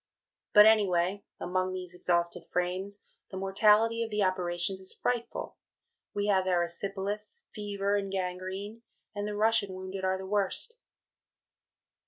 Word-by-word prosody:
But, 210 0 +10
anyway, 200 -3 +3 0.2
among 185 +1 -1
these 180 -1 -6
exhausted 170 -1 0
Frames, 185 +3 -2 0.3
the 190 - -7
mortality 210 +4 +4
of 230 - -1
the 210 -1 +1
operations 185 0 -1
is 190 0 -3
frightful. 240 -1 -3 0.6
We 205 0 0
have 190 -2 +2
Erysipelas, 195 - -2
fever 205 -1 -1
and 195 -1 -3
gangrene, 190 +3 -4 0.3
and 205 0 -3
the 210 - -3
Russian 210 -3 +2
wounded 190 +1 -6
are 190 0 +1
the 190 - -7
worst. 205 - 0
195 Hz, 130 wpm, -30 LUFS, 185-210 Hz, 0.6 s, But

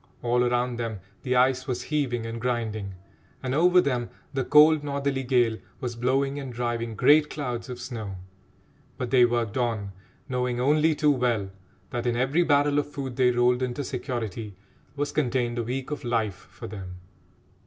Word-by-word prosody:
All 120 0 +2
around 120 0 0
them 115 -3 -3 0.2
the 125 -1 0
ice 130 +1 +3
was 125 -2 -2
heaving 130 -7 -1
and 115 0 -5
grinding, 110 -5 -2 0.5
and 130 0 -1
over 180 +5 +5
them 125 -8 0 0.2
the 135 -1 0
cold 150 +2 +6
northerly 140 -1 -1
gale 125 -4 +2 0.2
was 125 -3 -4
blowing 135 +4 0
and 135 -2 -6
driving 120 -1 -2
great 150 +7 +5
clouds 125 -4 -4
of 125 -1 -6
snow; 110 -6 -6 0.8
but 125 -3 -4
they 125 -2 +6
worked 120 -2 -1
on, 110 -5 -1 0.4
knowing 125 -2 -1
only 150 +4 +3
too 150 0 +3
well 120 -7 0 0.4
that 120 0 -2
in 120 - +1
every 135 +7 +2
barrel 145 -2 +3
of 145 - -3
food 135 -4 -5
they 130 -1 +4
rolled 125 +1 +2
into 130 +3 -2
security 115 -6 -4 0.4
was 145 0 -2
contained 120 -4 0
a - - 0
week 130 +4 -4
of 150 - -4
life 110 -6 -2
for - - -10
them. 95 -3 -7
125 Hz, 170 wpm, -26 LUFS, 120-140 Hz, 0.8 s, cold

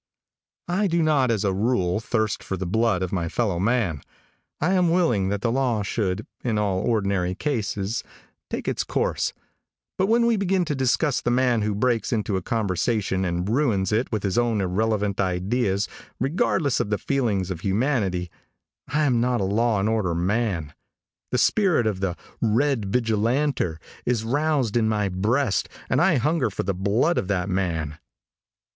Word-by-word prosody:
|I 190 +4 +1
DO 170 -2 +1
not, 145 -5 +3
as 110 -3 +1
a 95 - +1
rule, 95 -3 +1
thirst 110 -2 -1
for 95 - -3
the 95 - -3
blood 105 0 +1
of 90 - -3
my 85 -3 -1
fellow 100 -6 0
man. 100 - +1 0.6
I 175 +5 +1
am 180 -2 +3
willing 160 - +2
that 100 0 -2
the 115 0 +1
law 125 -4 +1
should 100 -2 -2 0.2
in 115 -4 0
all 100 -3 +1
ordinary 100 -5 0
cases 110 -5 -2 0.5
take - - -4
its - - 0
course, - - -1 0.7
but 190 - +3
when 235 +2 +3
we 235 -2 +3
begin 190 -2 +1
to 155 - -1
discuss 135 +1 +1
the - - -1
man 120 -2 +2
who 105 -1 0
breaks 115 +1 0
into 105 -3 0
a 95 - -1
conversation 100 -1 0
and 90 0 -1
ruins 110 -6 +1
it 110 +4 0
with 110 -3 -2
his 100 +3 +1
own 120 -3 +1
irrelevant 100 +1 0
ideas, 95 +2 0 0.3
regardless 140 0 +1
of - - -1
the 105 - +1
feelings 105 -10 -1
of 85 - -4
humanity, 100 - 0 0.6
I 155 +1 +1
am 125 -5 +2
not 125 -1 +1
a - - 0
law 105 +2 +1
and 100 - +1
order 105 -6 0
man. 90 -4 -1 0.6
The - - 0
spirit 185 - +3
of 105 -4 -1
the 95 -2 -1 0.3
"Red 115 +1 +2
Vigilanter" 115 - +1 0.3
is 120 -3 0
roused 140 -2 0
in 110 -2 +3
my 105 -2 0
breast 105 +6 0 0.2
and 130 - +3
I 170 -1 +4
hunger 145 0 +1
for 100 - -3
the 100 - -1
blood 100 - +1
of 95 - -4
that 95 -1 -1
man. 85 -6 -2
110 Hz, 175 wpm, -24 LUFS, 95-130 Hz, 0.7 s, I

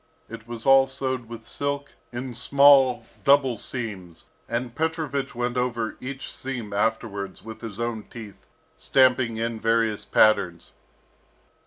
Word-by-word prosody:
It 115 0 -10
was 120 -1 -6
all 135 0 +6
sewed 130 -3 -3
with 115 -1 -9
silk, 140 0 -3 0.2
in 125 +1 -5
small, 135 -1 +5 0.2
double 140 -3 +4
seams, 95 -9 -6 0.2
and 120 0 -2
Petrovich 155 -4 -2
went 120 +1 -2
over 120 -3 -1
each 135 +1 -7
seam 120 -6 -5
afterwards 100 -2 -2
with 110 0 -9
his 115 -2 -7
own 115 -2 -3
teeth, 110 -4 -11 0.3
stamping 130 -3 +3
in 115 0 -2
various 115 -1 +1
patterns. 90 -6 +2
120 Hz, 130 wpm, -25 LUFS, 110-135 Hz, 0.3 s, all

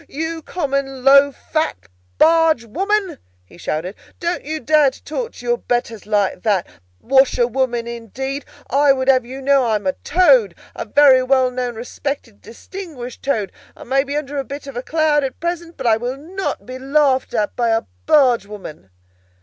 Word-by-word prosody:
"You 320 +2 -4
common, 275 -5 -3
low, 280 +1 +6
fat 310 +3 -2 0.4
barge 320 -6 +4
woman!" 385 - -1 0.3
he 130 - -18
shouted; 170 +4 -3 0.3
"don't 345 0 -2
you 310 +2 -4
dare 300 +1 +4
to 260 - -17
talk 470 +10 -4
to 245 - -12
your 240 0 +1
betters 230 -4 -3
like 205 -3 0
that! 200 -5 +1 0.3
Washerwoman 250 -2 +2
indeed! 245 +4 -5 0.2
I 280 0 +4
would 260 -1 -3
have 260 -2 +4
you 265 +2 -7
to - - -11
know 280 -1 +4
that 245 - 0
I 220 - +2
am 205 -2 -3
a 185 - +1
Toad, 390 +8 +3 0.2
a - - -5
very 280 -3 +6
well 255 0 +2
known, 250 -1 -3
respected, 240 -1 -6
distinguished 265 -2 -9
Toad! 220 -8 -1 0.3
I - - -10
may 270 +2 +1
be 285 +1 -3
under 290 -1 -3
a - - -1
bit 280 +2 -8
of 275 -2 -9
a 245 - -3
cloud 305 0 +1
at 265 -2 -4
present, 340 0 -4
but 265 - -6
I 225 -2 +4
will 245 +3 -4
not 370 +7 -5
be 255 +1 -8
laughed 270 -2 +1
at 210 -2 -1
by 240 -1 +1
a 225 0 +1 0.2
bargewoman!" 210 - +1
270 Hz, 180 wpm, -19 LUFS, 240-300 Hz, 0.4 s, low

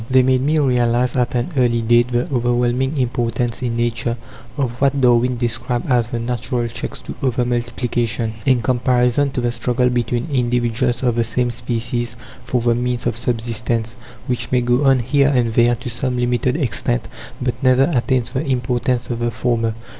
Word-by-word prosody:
They 130 0 +5
made 130 0 +2
me 150 +4 +1
realize 125 -3 +2
at 125 -1 0
an 120 +7 -1
early 120 -3 +2
date 120 +1 +3
the 120 +1 0
overwhelming 120 +3 +1
importance 120 -1 -1
in 120 -2 -2
Nature 120 0 -1 0.4
of 135 -4 0
what 140 0 +2
Darwin 125 0 +3
described 120 +1 -2
as 120 -2 +3
"the 120 -1 -4
natural 120 +1 -2
checks 115 - -6
to - - -7
over 125 -2 +1
multiplication," 120 -2 -1
in 130 -3 +2
comparison 125 +2 +2
to 125 - -1
the 120 0 0
struggle 125 +1 0
between 120 +2 -1
individuals 120 0 0
of 120 -2 +2
the 115 - +3
same 120 +1 0
species 120 0 -3 0.3
for 125 - -1
the 120 0 +2
means 120 0 -2
of - - 0
subsistence, 115 -1 -2 0.3
which 125 -1 -2
may 125 -1 +3
go 125 +3 +1
on 135 -1 +5
here 140 +3 +2
and 125 -5 +1
there, 120 +1 +4
to 125 +1 -6
some 125 +1 -2
limited 125 +1 0
extent, 115 - -1 0.3
but 125 +1 -3
never 130 0 +4
attains 125 -1 +1
the 130 +2 -2
importance 125 -2 -1
of 120 - -3
the 120 0 0
former. 115 -1 -1
120 Hz, 175 wpm, -19 LUFS, 120-125 Hz, 0.4 s, They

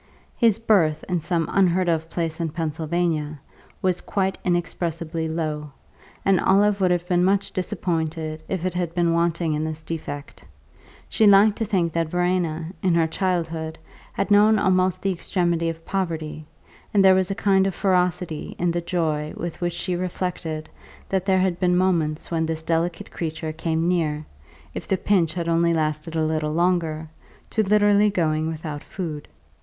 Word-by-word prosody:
His 225 -3 +3
birth, 185 -9 +2
in 180 -1 0
some 165 0 -1
unheard 185 -1 +3
of 165 -1 0
place 165 -1 -3
in 165 -1 -1
Pennsylvania, 160 -1 -2 0.4
was 185 -1 +1
quite 190 -2 -1
inexpressibly 165 -2 -2
low, 155 -2 -3 0.6
and 195 -2 +4
Olive 200 +1 +3
would 185 - +4
have 175 0 0
been 180 -1 +2
much 195 +1 +2
disappointed 160 -3 -2
if 185 -2 -2
it 185 - -1
had 175 -2 -2
been 170 -1 +2
wanting 170 -1 +1
in 150 +1 -1
this 155 0 -5
defect. 155 -3 -6 0.6
She 220 - +3
liked 200 +1 +6
to 225 - 0
think 180 -6 0
that 165 -1 0
Verena, 175 -2 0
in 180 -3 +2
her 165 -1 +4
childhood, 165 -2 -2 0.4
had - - -2
known 210 +2 +6
almost 185 -2 +2
the 195 - +1
extremity 170 -2 0
of 165 0 -7
poverty, 160 -5 -3 0.5
and 195 -1 +5
there 190 - +8
was 185 0 +2
a 195 - -2
kind 195 -1 +3
of 195 - -3
ferocity 180 -4 0
in 175 0 +1
the 175 0 -1
joy 155 -3 -1
with 170 0 -5
which 175 -1 -1
she 180 - -2
reflected 175 -3 -3 0.4
that 190 0 -1
there 190 -1 +4
had 185 -2 +1
been 180 -1 +2
moments 165 -5 0
when 160 -1 0
this 160 0 -3
delicate 165 +1 -1
creature 155 -1 -4
came 160 +1 -1
near 155 -4 0 0.5
(if - - -6
the 190 - +1
pinch 175 -5 +1
had 170 -2 -2
only 170 0 +2
lasted 155 +1 -2
a 160 -1 +1
little 155 -1 -1
longer) 165 -2 0 0.4
to 220 - +2
literally 205 0 +4
going 160 -5 0
without 155 -2 -5
food. 160 -6 -6
170 Hz, 170 wpm, -23 LUFS, 160-185 Hz, 0.6 s, there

